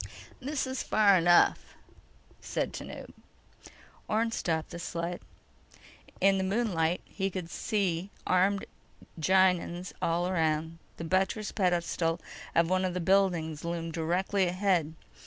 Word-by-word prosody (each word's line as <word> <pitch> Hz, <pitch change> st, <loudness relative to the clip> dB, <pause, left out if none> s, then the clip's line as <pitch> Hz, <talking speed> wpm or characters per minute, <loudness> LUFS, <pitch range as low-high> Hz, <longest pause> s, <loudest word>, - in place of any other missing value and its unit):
_ -, -, -14 dB, 0.4 s
"This 280 Hz, +2 st, -2 dB
is 260 Hz, -1 st, -3 dB
far 205 Hz, -2 st, +4 dB
enough," 175 Hz, -1 st, +4 dB, 0.6 s
said -, -, -3 dB
Tanub. -, -, -8 dB, 1.0 s
Orne 225 Hz, +2 st, +1 dB
stopped 160 Hz, -7 st, -2 dB
the 170 Hz, -, -6 dB
sled. 170 Hz, 0 st, -4 dB, 1.0 s
In 195 Hz, 0 st, +4 dB
the -, -, 0 dB
moonlight, 190 Hz, -5 st, 0 dB
he 195 Hz, -1 st, -3 dB
could 180 Hz, -3 st, -6 dB
see 190 Hz, -4 st, -1 dB, 0.2 s
armed 190 Hz, +2 st, +2 dB, 0.5 s
Gienahns 180 Hz, 0 st, +2 dB
all 170 Hz, +2 st, +1 dB
around. 160 Hz, -2 st, 0 dB, 0.2 s
The -, -, -6 dB
buttressed 190 Hz, +5 st, 0 dB
pedestal 175 Hz, -3 st, 0 dB, 0.4 s
of 165 Hz, 0 st, +4 dB
one 185 Hz, +1 st, +1 dB
of 185 Hz, -1 st, -1 dB
the -, -, 0 dB
buildings 170 Hz, -4 st, +1 dB
loomed 170 Hz, -1 st, -3 dB
directly 180 Hz, +4 st, 0 dB
ahead. 175 Hz, -4 st, +1 dB
180 Hz, 125 wpm, -29 LUFS, 165-195 Hz, 1.0 s, far